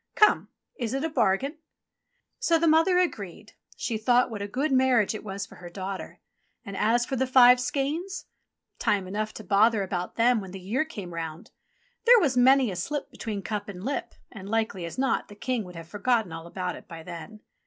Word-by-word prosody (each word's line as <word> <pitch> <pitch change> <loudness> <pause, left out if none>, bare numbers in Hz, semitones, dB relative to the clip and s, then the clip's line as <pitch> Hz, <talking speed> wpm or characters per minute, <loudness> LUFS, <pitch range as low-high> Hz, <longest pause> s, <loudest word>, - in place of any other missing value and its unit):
Come! 425 - +4 0.3
is 235 0 -2
it 270 - -2
a 325 - 0
bargain 265 +4 +1 0.4
?'* - - -55 0.3
So 335 - +3
the 330 - +1
mother 325 +4 +4
agreed. 215 - -2 0.2
She 225 -2 -2
thought 245 +2 +3
what 210 -2 -5
a 200 - -3
grand 270 +6 0
mar 260 -1 +4
riage 210 - +1
it 215 - -6
was 200 -1 -5
for - - -15
her 175 - -9
daughter. 190 +2 -6 0.4
And 200 - -7
as 235 +3 +2
for 265 - -3
the 265 +1 0
five 250 -1 +7
skeins? 295 +9 -2 0.5
Time 195 -3 +1
enough 215 +3 -2
to 215 - -8
bother 210 +2 +3
about 180 -2 -4
them 235 -1 +3
when 190 -2 -9
the 195 - -6
year 220 +11 -1
came 200 - -8
round. 165 -1 -6 0.5
There 485 0 +8
was 285 -9 +1
many 255 -1 +5
a - - -5
slip 285 +12 -3
between 205 -3 -5
cup 210 -1 -4
and 185 -2 -8
lip, 275 +3 -3 0.2
and, 195 -2 -9
likely 220 -5 -1
as 170 - -7
not, 265 0 0
the 205 - -12
King 240 +1 -2
would 180 -1 -11
have 165 -1 -9
forgotten 210 0 0
all 165 +1 -7
about 180 +1 -4
it - - -13
by 165 -2 -9
then. 180 +6 -9
220 Hz, 210 wpm, -27 LUFS, 195-260 Hz, 0.5 s, There